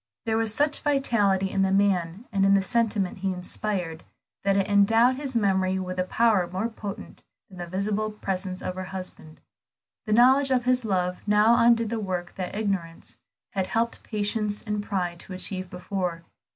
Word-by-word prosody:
There 220 -1 0
was 225 -1 +2
such 290 +6 +1
vitality 210 -10 +1
in 195 - 0
the 190 0 +2
man 195 0 +1
and 195 -1 +1
in 195 0 +5
the 195 - +3
sentiment 205 -3 0
he 195 0 -1
inspired, 180 -2 -4 0.4
that 195 0 +2
it 195 - +1
endowed 225 +5 +4
his 275 -3 -5
memory 190 -3 +1
with 185 -1 -4
a - - +3
power 200 -2 +2
more 190 +5 -2
potent 210 -2 -8 0.3
than 185 -2 -13
the 175 - -5
visible 205 +4 -1
presence 190 -3 -4
of 185 - -3
her 185 0 -5
husband. 185 -4 -9 0.7
The 215 - +1
knowledge 260 +4 +5
of 250 -2 +1
his 255 0 +2
love 180 -4 -1
now 210 +3 +5
undid 230 -1 +4
the 230 - -1
work 180 -4 -4
that 185 0 -5
ignorance 195 -6 -3 0.3
had 190 -2 -1
helped 230 +1 -1
patience 210 -1 -2
and 210 -1 -2
pride 180 -4 -3
to 190 - -7
achieve 185 0 -2
before. 180 -2 -4
200 Hz, 180 wpm, -26 LUFS, 185-220 Hz, 0.7 s, in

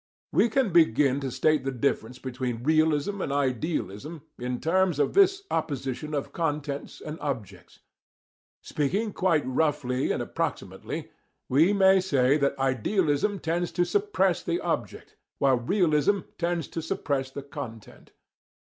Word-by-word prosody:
We 235 - +3
can 245 -3 +1
begin 140 -4 +4
to 135 -1 -3
state 155 +4 +2
the 135 - -1
difference 125 -2 -1
between 125 -2 -4
realism 155 +5 +2
and - - -2
idealism 145 - -2 0.2
in 125 0 -3
terms 180 -1 +2
of 150 - +1
this 390 0 +4
opposition 135 +1 -2
of 140 - -4
contents 150 -3 -3
and 155 +1 -7
objects. 130 -9 -6 0.8
Speaking 195 +9 -1
quite 175 -6 +1
roughly 130 -1 0
and - - -1
approximately, - - -4 0.4
we 155 +9 +4
may 190 -1 +5
say 140 -7 +2
that 140 -1 0
idealism 145 - +1
tends 170 0 -2
to 175 0 +2
suppress 415 - +1
the 345 - -1
object, - - -4 0.2
while 135 -2 +3
realism 175 - +2 0.2
tends 170 -3 -1
to 165 - -4
suppress 145 -6 -2
the 140 +1 -7
content. 125 -6 -9
150 Hz, 135 wpm, -27 LUFS, 135-175 Hz, 0.8 s, may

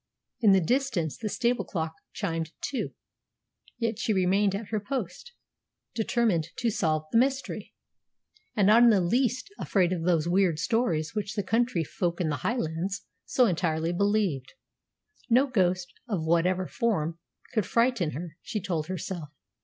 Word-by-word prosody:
In 215 -4 +5
the 195 - +6
distance 240 - 0
the 215 - -4
stable 245 +2 +1
clock 160 -3 -3 0.2
chimed 165 0 -3
two. 275 - -3 0.8
Yet 230 -2 -1
she 230 -3 +1
remained 195 +1 +2
at 205 +1 -5
her 215 - 0
post, 255 - -5 0.6
determined 220 -7 +1
to 235 -2 0
solve 155 -6 0
the 230 - +5
mystery, 270 +2 -1 0.8
and 205 -4 +3
not 215 +4 +7
in 240 - +8
the 210 -4 +5
least 245 - 0
afraid 185 -3 +2
of 175 - -2
those 165 -2 +2
weird 180 -2 +3
stories 165 -5 0
which 210 0 -3
the 205 - -1
country 225 -3 +1
folk 170 +2 -2
in 170 -3 0
the 145 - -1
Highlands 190 - -2 0.2
so 250 - +3
entirely 165 -4 0
believed. 200 -8 0 0.8
No 250 +4 +5
ghost, 185 -7 0 0.2
of 180 -7 -1
whatever 180 +3 +2
form, 170 -7 -1 0.3
could 215 -6 +1
frighten 230 -9 +2
her, 165 +2 -7
she 215 - -3
told 170 -6 -2
herself. 180 -3 -5
190 Hz, 155 wpm, -28 LUFS, 170-230 Hz, 0.8 s, in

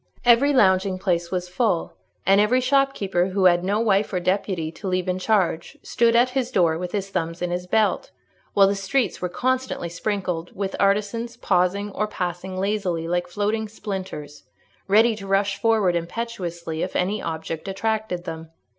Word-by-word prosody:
Every 245 +4 +5
lounging 190 -6 +3
place 175 -3 -1
was 180 -1 -2
full, 185 -1 0 0.3
and 195 +2 +5
every 235 +5 +3
shopkeeper 255 -9 +1
who 190 0 0
had 175 -1 +5
no 200 +3 +1
wife 210 -2 +2
or 185 - 0
deputy 185 -3 -1
to 195 +4 -8
leave 185 0 -1
in 185 0 -1
charge, 185 -4 0
stood 235 -1 +2
at 245 +2 +4
his 255 -2 -1
door 170 -8 +2
with 175 +2 -4
his 195 -1 -3
thumbs 165 -2 -2
in 180 0 -2
his 180 0 -3
belt; 220 - +1 0.5
while 200 - +7
the 195 - +2
streets 200 +6 -1
were 180 - -1
constantly 255 -3 -1
sprinkled 180 -2 -3
with 195 0 -3
artisans 210 +4 0
pausing 195 +2 +1
or 215 +2 -1
passing 185 -1 -4
lazily 190 -5 -1
like 175 +1 -1
floating 210 +4 -1
splinters, 190 -9 -6 0.4
ready 220 +3 +4
to 195 -2 -8
rush 195 0 +1
forward 220 -6 +3
impetuously 170 -4 -4
if - - -3
any 195 +4 0
object 160 +1 -5
attracted 205 -2 -2
them. 160 -2 -7
195 Hz, 170 wpm, -23 LUFS, 175-215 Hz, 0.5 s, while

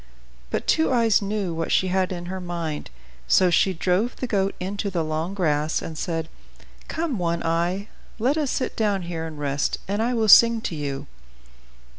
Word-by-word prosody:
But - - -2
Two 320 -2 +2
Eyes 230 -4 +3
knew 200 -3 -2
what 165 0 -3
she 185 - +2
had 185 0 +1
in 175 -1 -5
her 190 +2 -5
mind. 170 -4 -4 0.4
So 185 -2 +4
she 190 - +4
drove 185 +6 0
the - - -4
goat 195 -4 0
into 200 +3 -3
the 175 -4 -1
long 160 +4 -3
grass, 155 -4 +1
and 160 - -7
said, 165 0 -3 0.6
"Come, 315 - -2
One 170 -1 -1
Eye, 170 +4 0 0.3
let 250 +6 +1
us 300 -4 0
sit 255 - -2
down 205 -4 0
here 165 -1 -4
and 155 -2 -9
rest, 140 -1 -1
and 205 +2 -1
I 240 +2 +1
will 225 -2 +1
sing 230 +2 +8
to 180 - -3
you." 140 -2 -4
185 Hz, 185 wpm, -24 LUFS, 165-215 Hz, 0.6 s, sing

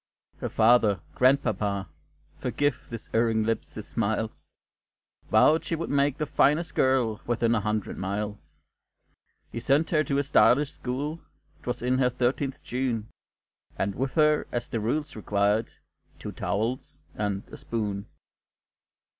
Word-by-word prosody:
Her - - -4
father 110 -4 +4
grandpapa! 105 -7 +2 0.5
forgive 145 0 -1
This 115 -2 -7
erring 115 -1 +2
lip 115 +1 +1
its 105 - -10
smiles 110 0 -2 0.8
Vowed 150 +9 +5
she 165 - -2
would 165 +1 -4
make 140 0 +2
the 150 - -1
finest 150 +3 +2
girl 125 -5 +2
Within 115 -1 +2
a 115 - +2
hundred 105 0 -2
miles. 105 +2 -5 0.9
He - - -4
sent 140 +6 +2
her 155 -2 +3
to 140 +1 0
a 140 - +2
stylish 140 0 +4
school; 145 +6 -4 0.4
'Twas 125 -1 -4
in 130 +1 +2
her 125 -1 +4
thirteenth 130 +2 -1
June; 120 -4 -2 0.7
And 100 +1 -1
with 130 +4 -3
her, 150 -1 +3
as 120 0 -3
the 115 - -2
rules 145 +8 -2
required, 105 +1 +1 0.5
"Two - - -6
towels 115 +6 -3
and 100 -2 -2
a - - -9
spoon." 105 -4 -3
120 Hz, 140 wpm, -27 LUFS, 110-140 Hz, 0.9 s, Vowed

